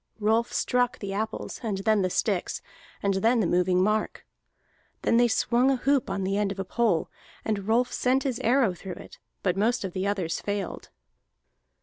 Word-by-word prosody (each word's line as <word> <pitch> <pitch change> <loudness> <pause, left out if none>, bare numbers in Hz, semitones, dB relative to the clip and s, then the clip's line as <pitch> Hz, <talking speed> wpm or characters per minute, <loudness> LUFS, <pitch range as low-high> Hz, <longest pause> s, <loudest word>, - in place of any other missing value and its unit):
Rolf 220 +2 +2
struck 245 -1 +1
the 195 -1 -5
apples, 220 +2 -4
and 215 -5 -2
then 210 +1 +2
the 185 - +1
sticks, 190 0 -1 0.4
and 200 0 +2
then 225 +5 +2
the 215 - +2
moving 180 +1 +2
mark. 215 +2 -1 0.8
Then 230 - +3
they 240 0 +5
swung 240 +3 +2
a 270 - +3
hoop 270 +1 +1
on 195 0 -2
the 195 +1 0
end 205 -1 +1
of 200 - -6
a 195 - -3
pole, 215 -5 0 0.3
and 205 -2 -2
Rolf 240 +3 +2
sent 260 +2 +1
his 260 -4 -2
arrow 245 -4 +3
through 180 +1 -7
it, - - -12 0.2
but 180 -2 +1
most 220 +5 +1
of 190 -2 -4
the 190 +1 -1
others 190 -5 -1
failed. 205 -1 -4
210 Hz, 190 wpm, -27 LUFS, 195-235 Hz, 0.8 s, they